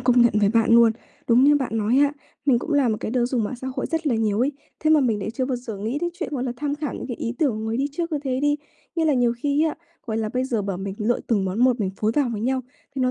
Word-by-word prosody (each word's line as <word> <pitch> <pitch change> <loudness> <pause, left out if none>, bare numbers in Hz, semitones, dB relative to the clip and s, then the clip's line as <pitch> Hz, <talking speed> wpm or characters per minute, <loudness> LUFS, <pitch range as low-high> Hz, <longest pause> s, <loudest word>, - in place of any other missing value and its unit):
công 245 -1 +4
nhận 235 - +4
với 205 - +4
bạn 225 +1 +2
luôn, 230 -1 +7 0.4
đúng 245 +2 +5
như 290 +1 +6
bạn 260 -5 -2
nói 220 +5 +2
á. 285 0 +4 0.3
Mình 260 -4 +5
cũng 315 - -4
là 285 -4 +3
một 220 - +1
cái - - -3
đứa 245 -1 +1
dùng 245 -3 0
mạng 245 +4 -4
xã 260 - -7
hội - - -1
rất 325 -1 -2
là 255 - +2
nhiều 220 -1 +1
ấy, 270 +4 +2 0.3
thế 310 - +2
mà 310 -1 +6
mình 230 -6 +1
lại 205 - -3
chưa 260 +2 -2
bao 255 -1 -1
giờ 235 -3 -7
nghĩ 225 +8 -2
đến 345 +1 -2
chuyện, 345 - -3
gọi 260 -3 -2
là, 250 - -2
tham 290 +1 -2
khảo 295 -1 -4
những - - -6
cái 245 - -4
ý 230 - -3
tưởng 295 -4 +3
của 215 - -5
người 220 +1 -2
đi 275 +3 +1
trước 335 +1 -3
như 295 - +1
thế 260 -1 -1
đi. 290 +1 +2 0.4
Nghĩa 330 - +2
là 300 - +3
nhiều 245 -2 +3
khi 290 +4 +1
á, 315 - 0 0.3
gọi 220 - -2
là, 220 -1 -1
bây 255 +4 -1
giờ 235 -6 -1
bảo 195 -2 -3
mình 190 +1 -5
lựa 225 +3 0
từng 205 -5 +1
món 190 +2 -2
một 250 -3 +3
mình 190 - 0
phối 215 +1 0
vào 285 -4 +2
với 210 - -4
nhau, 260 +3 0 0.3
thì 270 - -3
nó 255 - +2
250 Hz, 325 wpm, -23 LUFS, 225-285 Hz, 0.4 s, luôn